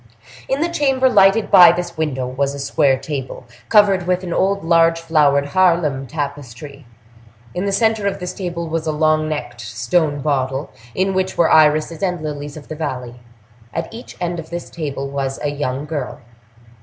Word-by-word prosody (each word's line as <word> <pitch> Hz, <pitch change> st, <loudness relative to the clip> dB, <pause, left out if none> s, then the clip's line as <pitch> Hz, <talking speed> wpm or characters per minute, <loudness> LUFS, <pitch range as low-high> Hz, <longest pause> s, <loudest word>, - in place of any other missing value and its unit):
In 270 Hz, +2 st, 0 dB
the 335 Hz, -, +2 dB
chamber 270 Hz, -5 st, +2 dB
lighted 205 Hz, -3 st, +4 dB
by 175 Hz, -2 st, +9 dB
this 175 Hz, 0 st, -4 dB
window, 145 Hz, -5 st, -2 dB
was 135 Hz, +2 st, -2 dB
a -, -, -7 dB
square 140 Hz, 0 st, +2 dB
table, 135 Hz, -3 st, -6 dB, 0.2 s
covered 200 Hz, -4 st, +4 dB
with 180 Hz, 0 st, 0 dB
an 175 Hz, -2 st, -4 dB
old 195 Hz, 0 st, 0 dB
large 165 Hz, 0 st, +3 dB
flowered 145 Hz, -4 st, +2 dB
Haarlem 165 Hz, -7 st, +2 dB
tapestry; 140 Hz, -1 st, -7 dB, 0.7 s
in 180 Hz, -, -2 dB
the -, -, 0 dB
center 220 Hz, 0 st, +1 dB
of 200 Hz, -, -2 dB
this 180 Hz, -1 st, -5 dB
table 170 Hz, -3 st, -4 dB
was 160 Hz, 0 st, -3 dB
a -, -, +1 dB
long 155 Hz, 0 st, +1 dB
necked 150 Hz, -5 st, -5 dB
stone 125 Hz, +8 st, -1 dB
bottle, 135 Hz, -1 st, -1 dB, 0.2 s
in 190 Hz, +1 st, 0 dB
which 190 Hz, 0 st, -1 dB
were 170 Hz, -, +3 dB
irises 155 Hz, +1 st, +3 dB
and 180 Hz, -4 st, -1 dB
lilies 145 Hz, -1 st, -6 dB
of 150 Hz, -, -11 dB
the 155 Hz, -, -6 dB
valley; 125 Hz, -6 st, -5 dB, 0.6 s
at 165 Hz, +6 st, -4 dB
each 235 Hz, +2 st, -10 dB
end 175 Hz, -1 st, -2 dB
of 160 Hz, -, -9 dB
this 175 Hz, 0 st, -6 dB
table 140 Hz, -4 st, -4 dB
was 135 Hz, -1 st, -3 dB
a 145 Hz, -, 0 dB
young 140 Hz, -1 st, -3 dB
girl. 150 Hz, -4 st, -4 dB
155 Hz, 180 wpm, -19 LUFS, 140-180 Hz, 0.7 s, by